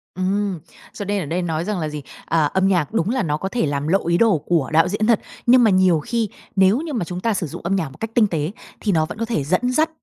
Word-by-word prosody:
Ừm, 190 0 -1 0.3
cho 205 - -6
nên 200 -1 -1
ở - - -6
đây 170 +5 -2
nói 165 -1 -2
rằng 210 -2 -2
là 155 -2 -2
gì? 150 0 -6 0.2
Ờ, 160 -3 +2
âm 190 0 +2
nhạc 175 -7 +1
đúng 175 - +1
là 255 +2 0
nó 150 -3 -1
có 190 - -4
thể 235 -1 0
làm 145 0 -2
lộ 190 +1 +1
ý 170 0 +3
đồ 220 -6 +4
của 160 -7 +1
đạo 165 +3 +5
diễn 210 +3 -1
thật. 235 -3 +4 0.3
Nhưng 245 +1 +6
mà 225 - +5
nhiều 185 -3 +4
khi, 225 +6 -2 0.3
nếu 195 +4 +4
như 320 -2 -5
mà 220 -9 -1
chúng 180 +1 -5
ta 225 +1 +1
sử 180 -4 -2
dụng - - -8
âm 185 +3 0
nhạc 165 -7 -1
một 135 - -15
cách 225 0 -4
tinh 225 -3 +5
tế 160 -3 -2 0.3
thì 210 - 0
nó 160 -3 +2
vẫn 155 - -8
có 230 - -2
thể 225 -11 -1
dẫn 185 - 0
dắt 310 +5 +2
185 Hz, 295 wpm, -21 LUFS, 160-215 Hz, 0.3 s, Nhưng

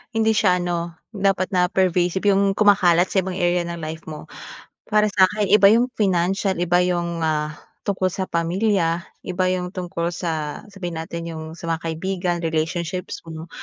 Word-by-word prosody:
hindi 220 0 +3
siya 200 -4 +3
ano 170 -1 -3 0.2
dapat 195 -2 0
na 180 -2 +3
pervasive, 180 0 +1
yung 195 0 +2
kumakalat 185 -4 +4
sa 195 - +3
ibang 185 0 -3
area 175 -1 +1
ng 170 - -4
life 160 +1 -6
mo. 155 -1 -9 0.5
Para 215 0 +2
sa'kin 200 +1 +2
iba 210 -1 +6
yung 240 +3 +3
financial, 190 -1 +1
iba 175 0 +3
yung, 170 -2 -1
ah, 150 -1 -1 0.3
tungkol 185 -2 0
sa 190 -1 -3
pamilya, 170 0 +1 0.2
iba 185 +1 -1
yung 180 -1 -2
tungkol 175 -3 -3
sa, 160 -4 -3
sabihin 175 -5 -5
natin 170 +1 -6
yung 160 0 -7
sa - - -12
mga 165 -1 -1
kaibigan, 175 +2 -2
relationships 165 +2 -2
mo, 160 0 -8
180 Hz, 165 wpm, -22 LUFS, 170-195 Hz, 0.5 s, iba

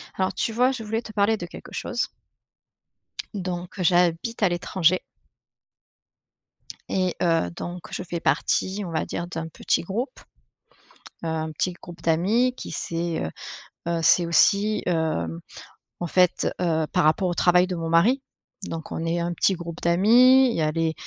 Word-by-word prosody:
Alors 190 0 0
tu 225 - -1
vois, 250 +3 +3
je 245 -4 -5
voulais 225 +2 -2
te 220 - -10
parler 210 +2 +2
de 175 - -6
quelque 170 - -11
chose. 240 -1 -2 1.3
Donc 180 -1 -5
j'habite 180 +5 +2
à 195 - +5
l'étranger 175 0 +1 1.9
et 185 -2 0
heu, 165 - +2
donc 175 0 -6
je - - -4
fais 175 -1 -4
partie 190 +4 0
on 170 - -6
va 160 - -1
dire 175 - -4
d'un 165 -2 -5
petit 165 - -1
groupe, 215 +10 -4 1.0
heu, - - -2
un 160 0 -2
petit 180 +4 -1
groupe 175 0 -12
d'amis 205 +10 +2
qui - - -8
s'est, 170 0 -3
heu 80 - -3 0.6
heu, 170 -1 0
c'est 170 +2 +5
aussi, 200 +5 +3
hem, 155 - -1 0.6
en 175 - -2
fait, 180 +1 +2
heu, 160 -3 +1
par - - +3
rapport 160 +5 +3
au - - -1
travail 180 +1 +4
de 180 - -3
mon 165 -1 -3
mari 205 +12 +4 0.4
donc 165 -1 -6
on 165 - -3
est 170 +1 0
un 170 +1 -2
petit 190 - +2
groupe 170 -1 -8
d'amis, 245 +9 +6
il - - -3
y - - 0
a 155 0 +1
les 165 0 0
175 Hz, 170 wpm, -24 LUFS, 165-200 Hz, 1.9 s, d'amis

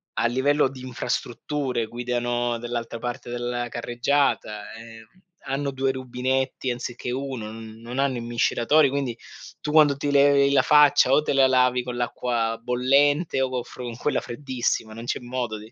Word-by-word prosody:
a - - 0
livello 135 +4 +2
di 130 -1 -11
infrastrutture, 125 0 -3
guidano 120 0 -2
dall'altra 120 0 -4
parte 120 0 -5
della 120 0 -3
carreggiata, 120 -3 -1
ehm, 115 0 -11 0.4
hanno 140 +1 -1
2 135 0 0
rubinetti 130 0 -2
anziché 120 0 -5
uno 130 -4 -4
n 110 0 -10
non 120 +3 -5
hanno 135 -2 +1
i - - -4
miscelatori 120 +5 +2
quindi 135 -3 -2 0.5
tu 150 - -3
quando 150 -2 +5
ti 145 +1 -2
levi 140 0 +5
la 140 - +4
faccia, 150 -3 +5
o 135 - +5
te 150 - -1
la 135 -1 +5
lavi 125 -1 +3
con 125 0 -5
l'acqua 120 -2 -1
bollente 135 +5 +2
o 130 - +1
con 125 -1 -2
fro 120 +1 -10
con 120 -1 -6
quella 145 - 0
freddissima 120 -4 -3
non 115 +2 -8
c'è - - -2
modo 120 -2 -4
125 Hz, 165 wpm, -24 LUFS, 120-135 Hz, 0.5 s, quando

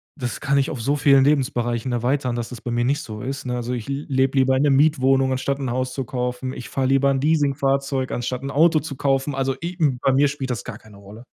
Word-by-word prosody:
das 125 -5 -4
kann 140 -2 +1
ich 135 - 0
auf 125 - -5
so 140 +6 0
vielen 140 -2 +5
Lebensbereichen 125 -4 0
erweitern, 125 +1 0
dass 120 -1 -4
das 120 -4 -9
bei 120 - -5
mir 120 0 0
nicht 145 +4 0
so 105 -6 -8
ist, 135 +3 -5
ne? 125 - -2
Also, 120 +1 -3
ich 120 -1 -5
le 140 +2 -3
lebe 135 0 +1
lieber 130 0 +4
in 130 - +2
der 145 - +3
Mietwohnung 135 -2 +3
anstatt 135 +1 -1
'n 130 -3 -3
Haus 130 +1 -2
zu 135 - -3
kaufen. 125 +1 -3
Ich 120 -3 -8
fahr 135 -1 -1
lieber 135 +1 +3
'n 135 -1 +1
Leasing 145 -1 +2
Fahrzeug 135 -1 -1
anstatt 125 +2 -3
'n 140 - -4
Auto 160 +2 +4
zu 150 -2 -7
kaufen. 135 +1 0
Also, 135 -1 -1
i 175 +2 -4 0.3
bei 135 - +3
mir 140 +2 +4
spielt 140 -2 -4
das 120 - -4
gar 120 -4 -7
keine 105 -2 -17
Rolle. 100 +4 -13
135 Hz, 260 wpm, -22 LUFS, 125-140 Hz, 0.3 s, vielen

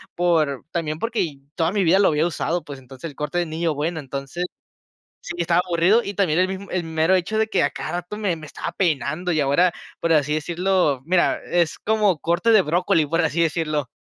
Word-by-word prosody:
por, 160 -6 +1
también, 155 -2 -2
porque 225 -10 -1 0.2
toda 165 +1 +1
mi 200 -1 +1
vida 185 +4 +5
lo 200 - +5
había 155 +2 +2
usado, 170 +1 -2
pues, 140 -3 -8
entonces, 130 +4 -9
el 145 - -14
corte 150 +4 -3
de 175 - 0
niño 160 0 -2
bueno, 160 +3 -2
entonces 140 +5 -5 0.8
Sí, 175 - -5
estaba 170 0 +2
aburrido. 180 +6 +3
Y 200 - -5
también, 180 -4 +2
el 185 - +2
mismo 190 +1 -6
el 180 - 0
mero 160 +2 +2
hecho 190 +4 0
de 220 - +3
que, 195 - +1
a 145 - +2
cada 155 - -6
rato, 175 +3 -4
me 205 -4 0
me 155 - -10
estaba 155 - -6
peinando. 170 0 -1
Y 155 - 0
ahora, 145 +6 +3 0.3
por 165 - +1
así 150 -1 +2
decirlo, 175 -2 +1
mira, 175 +3 +2
es 170 -3 0
como 210 -6 +1
corte 175 +8 +1
de 215 - +7
brócoli, 170 0 +1
por 165 +3 +1
así 160 +1 0
decirlo. 155 -4 -1
170 Hz, 215 wpm, -22 LUFS, 155-180 Hz, 0.8 s, de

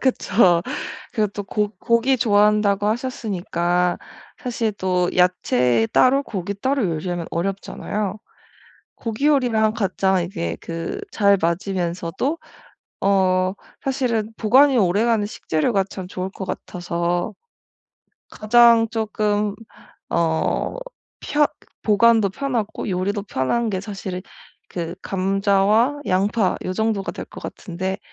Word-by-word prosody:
그쵸. 195 -9 +3 0.5
그리고 215 -3 +1
또 205 - -4
고 210 +1 -1
고기 235 +3 +2
좋아한다고 210 -3 +3
하셨으니까 180 -7 -1 0.4
사실 230 -3 -1
또 185 -3 0
야채 125 -10 +3
따로 270 +2 +4
고기 200 -6 -4
따로 260 +5 0
요리하면 170 +1 -3
어렵잖아요. 195 +2 -3 0.8
고기 230 +5 -2
요리랑 240 -7 +3
가장 190 -3 +1
이제 85 - -4
그 165 - -5
잘 200 -2 +4
맞으면서도 175 - -1 0.6
어 185 -1 +2 0.3
사실은 245 -6 -1
보관이 265 +5 +5
오래가는 210 +3 +2
식재료가 195 +1 0
참 185 -2 -7
좋을 185 0 -4
것 190 - -7
같아서 175 +2 -2 1.0
가장 230 +1 +5
쪼끔 210 -2 0 0.6
어 160 -1 0 0.5
펴 295 0 +3 0.4
보관도 220 -1 +4
편하고 235 -3 -3
요리도 195 +3 -1
편한 210 - -1
게 190 -2 -2
사실 195 -3 -6 0.5
그 170 -1 -4
감자와 200 +7 +2
양파 195 +1 +1
요 185 - -2
정도가 215 -1 -1
될 - - -6
것 - - -11
같은데 185 +1 -5
200 Hz, 240 characters per minute, -22 LUFS, 180-225 Hz, 1.0 s, 보관이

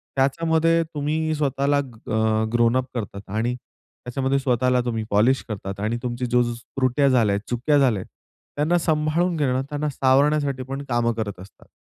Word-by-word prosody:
त्याच्यामध्ये 160 +4 +2
तुम्ही 155 +2 -1
स्वतःला 140 0 +1
अ 110 -4 -1
ग्रोन 120 +1 +3
अप 130 - 0
करतात 100 -3 -5
आणि 115 +4 -1
त्याच्यामध्ये 130 +2 -4
स्वतःला 125 -1 +2
तुम्ही 115 -2 -2
पॉलिश 115 +6 +3
करतात 100 -1 -5
आणि 110 +3 -1
तुमची 125 0 -2
जो 125 0 +3
जो 120 0 -2
त्रुट्या 130 +3 0
झाल्या 115 -6 +3
आहेत, 100 - -6
चुका 130 +5 +2
झाल्या 125 -8 +3
आहेत, - - -11 0.5
त्यांना 155 +4 +2
सांभाळून 160 +2 +1
घेणं, 130 -3 +1
त्यांना 150 0 -2
सावरण्यासाठी 140 0 +2
पण 135 +2 -5
कामं 120 -1 +1
करत 105 -4 -4
असतात 95 - -16
130 Hz, 160 wpm, -23 LUFS, 115-145 Hz, 0.5 s, ग्रोन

